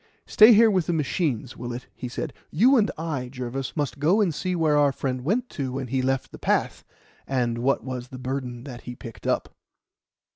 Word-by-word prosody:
"Stay 215 +2 +7
here 225 0 +7
with 185 -4 +1
the 175 - +1
machines, 145 - -1
Willett," 120 +1 -6 0.2
said - - -4 0.2
he. - - -12
"You 250 +9 +6
and 220 -4 +3
I, 150 -6 -3
Jervis, 130 +3 -5
must 145 -1 -2
go 170 +9 +3
and 190 -6 +2
see 185 +4 -2
where 160 -3 +2
our 145 -1 +4
friend 130 -1 -3
went 225 - 0
to 130 -3 -4
when 130 -2 -4
he 130 +1 0
left 135 0 -1
the - - -11
path, - - 0 0.4
and 120 -3 0
what 135 +3 +1
was 130 -1 -5
the 130 - -9
burden 125 -2 -4
that 125 -3 -8
he 125 - -8
picked 115 -2 -9
up." - - -1
135 Hz, 205 wpm, -25 LUFS, 125-165 Hz, 0.4 s, Stay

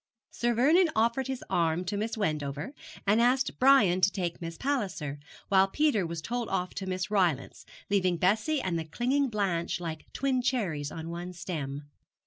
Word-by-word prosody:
Sir 240 0 0
Vernon 320 +9 +5
offered 235 +4 +1
his 265 -1 -4
arm 175 -1 +1
to 190 - -2
Miss 220 +3 -2
Wendover, 150 - -2 0.3
and 210 +3 +4
asked 255 +2 +2
Brian 235 -9 +5
to 195 - +5
take 180 -3 -3
Miss 165 -1 -6
Palliser, 195 - -2 0.3
while 195 -1 +5
Peter 220 - +1
was 165 -1 -5
told 240 -1 -3
off 180 -1 -1
to 190 - -5
Miss 185 +1 -3
Rylance, 175 -9 0 0.2
leaving 185 -3 +2
Bessie 215 - +2
and 170 -3 -1
the 160 - -4
clinging 255 - 0
Blanche 185 -6 -1
like 160 -3 -6
twin 265 -2 0
cherries 180 - -1
on 165 0 -6
one 175 +1 -6
stem. 150 -5 -5
190 Hz, 170 wpm, -29 LUFS, 170-240 Hz, 0.3 s, Vernon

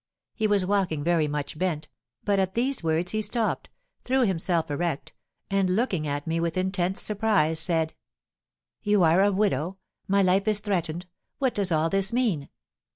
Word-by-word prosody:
He 220 -2 0
was 205 -3 +2
walking 185 -6 0
very 165 -2 +2
much 150 +1 -4
bent, 170 -5 -1 0.4
but 200 -2 +1
at 190 0 -1
these 255 -1 +1
words 165 +2 +1
he 215 - 0
stopped, 230 +1 -1 0.3
threw 260 +1 +1
himself 175 -6 0
erect, 165 0 -2 0.4
and 190 -2 +2
looking 190 -9 0
at 145 0 -3
me 165 +1 -1
with 170 +1 -1
intense 185 0 0
surprise, 205 -7 +2
said: 160 -1 +1 0.9
"'You 205 -3 +3
are 165 +3 +5
a 205 +1 +4
widow? 190 -3 0 0.3
My 200 0 +3
life 190 +3 +2
is 210 -1 +3
threatened? 180 -4 -2 0.3
What 260 -4 0
does 195 -3 0
all 160 0 +2
this 195 0 +1
mean?' 225 - 0
185 Hz, 165 wpm, -26 LUFS, 165-205 Hz, 0.9 s, are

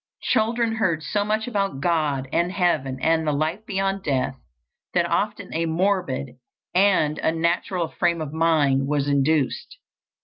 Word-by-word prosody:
Children 230 -1 +1
heard 170 -8 0
so 205 +7 0
much 215 +2 -1
about 195 - -1
God, 150 -5 0
and 170 +1 +1
heaven, 155 -9 0
and 160 -1 +2
the - - +3
life 155 +8 -1
beyond 195 -1 -1
death, 135 -5 -1 0.6
that - - +3
often - - -2
a 165 +1 0
morbid 160 -7 -1 0.4
and 180 -6 +3
unnatural 170 +2 0
frame 170 -1 0
of 155 -2 -5
mind 150 -5 +2
was 145 -1 0
induced. 140 0 0
165 Hz, 140 wpm, -23 LUFS, 145-195 Hz, 0.6 s, the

